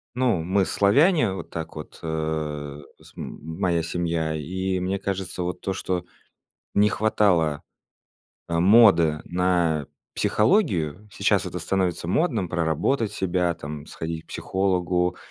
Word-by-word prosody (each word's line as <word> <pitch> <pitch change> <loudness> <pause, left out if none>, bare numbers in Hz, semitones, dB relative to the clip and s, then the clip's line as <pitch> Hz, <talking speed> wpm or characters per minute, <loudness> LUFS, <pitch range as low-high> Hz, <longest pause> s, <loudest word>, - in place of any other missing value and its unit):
ну, 125 -8 +1
мы- 95 +3 +2
славяне, 140 - +3
вот - - -7
так 80 -1 -6
вот, 75 - -9
э, 75 -2 -3 0.2
см - - -16
м 80 +3 -7
моя 85 -4 +1
семья, 80 -1 -1
и 95 +5 -2
мне 95 +2 -1
кажется, 95 -2 -3
вот 90 0 -4
то, 95 - -2
что 90 -1 -2 0.7
не 105 +1 +4
хватало, 90 -10 +2 0.9
а, 85 0 0
моды 90 -7 +6
на 85 -4 +1 0.3
психологию. 105 - +1
Сейчас - - +1
это - - -4
становится 90 -3 -1
модным, 115 - +1
проработать 90 - 0
себя 90 -3 0
там, 75 -1 -8
сходить 80 0 -5
к - - -36
психологу, 90 -2 0
90 Hz, 130 wpm, -24 LUFS, 80-100 Hz, 0.9 s, моды